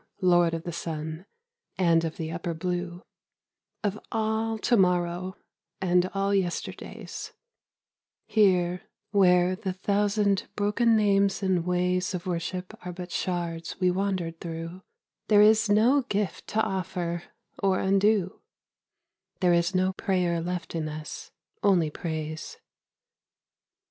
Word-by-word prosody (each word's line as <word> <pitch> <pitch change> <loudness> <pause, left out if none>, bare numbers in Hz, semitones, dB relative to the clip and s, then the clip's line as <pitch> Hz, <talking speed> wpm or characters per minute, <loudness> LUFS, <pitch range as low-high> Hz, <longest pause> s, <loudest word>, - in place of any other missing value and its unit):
Lord 175 -2 +4
of 165 - -5
the 175 - -4
Sun, 160 +1 -5 0.5
and 170 -3 +3
of 160 -1 -3
the 160 -1 -4
upper 170 0 -3
blue, 180 +1 -3 0.8
Of 205 0 -1
all 220 0 0
To 235 - +2
morrow, 180 -1 +1 0.4
and 180 0 +2
all 195 +1 +1
yesterdays, 185 -3 -3 0.9
Here, 180 -4 +3 0.3
where 180 -2 +4
the 190 -1 -4
thousand 200 +1 +1
broken 215 +3 +2
names 200 -2 +2
and 180 -3 +1
ways 180 +1 +1
Of 175 - -5
worship 180 +1 -3
are 180 - -5
but 180 0 -8
shards 170 -2 -3
we 180 -1 +3
wandered 180 -3 -2
through, 165 +2 -6 0.5
There 210 -1 +6
is 215 0 +5
no 235 +7 +5
gift 205 -5 -3
to 220 +1 +1
offer, 180 -4 -3 0.4
or 195 -1 +3
undo; 195 -1 +2 1.0
There 180 -2 +4
is 170 +2 +2
no 185 +1 +2
prayer 180 -4 0
left 175 0 -4
in 160 -2 -2
us, 155 0 -7 0.3
only 175 -6 +3
praise. 155 -1 -5
180 Hz, 125 wpm, -27 LUFS, 170-200 Hz, 1.0 s, There